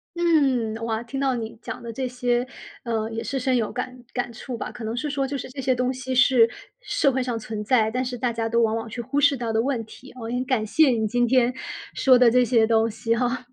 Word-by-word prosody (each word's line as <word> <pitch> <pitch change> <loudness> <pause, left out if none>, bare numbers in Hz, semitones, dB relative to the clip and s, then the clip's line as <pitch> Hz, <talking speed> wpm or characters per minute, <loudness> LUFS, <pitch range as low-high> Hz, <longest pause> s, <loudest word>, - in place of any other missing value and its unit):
嗯， 275 -10 +2
哇， 225 -1 -1
听 270 +3 -5
到 265 -2 +1
你 225 -1 -5
讲 - - -7
的 235 - -6
这 265 +2 -3
些， 245 -1 0 0.4
呃， 225 -2 -2
也 225 0 -4
是 270 - -2
深 260 0 +1
有 230 -3 0
感 250 0 -5 0.2
感 245 -1 -2
触 240 +2 -6
吧， - - -5
可 240 - -9
能 220 +1 -3
是 295 +4 -2
说 275 -1 -1
就 275 +1 -3
是 255 - -7
这 270 +1 -6
些 260 0 +2
东 250 +1 0
西 260 0 -5
是 250 -2 +5 0.3
社 280 - +1
会 260 0 0
上 240 -2 -2
存 215 -1 -5
在， 220 -1 +3
但 250 +3 -1
是 250 -1 -4
大 240 -1 -1
家 225 0 -2
都 235 0 +2
往 225 -1 +2
往 225 0 -4
去 240 - -7
忽 280 +4 -1
视 280 -1 +4
到 230 -2 -3
的 220 - +2
问 255 -3 -1
题， 260 +4 -14
我 230 - -6
很 245 +1 -1
感 255 -5 0
谢 305 +7 +4
你 225 -3 +1
今 245 +3 +2
天 250 0 +3 0.4
说 255 -2 +5
的 250 -1 +7
这 250 +2 +4
些 230 -2 +3
东 225 0 +2
西 225 +2 -1
哈， 245 +1 -1
245 Hz, 275 characters per minute, -24 LUFS, 225-260 Hz, 0.4 s, 的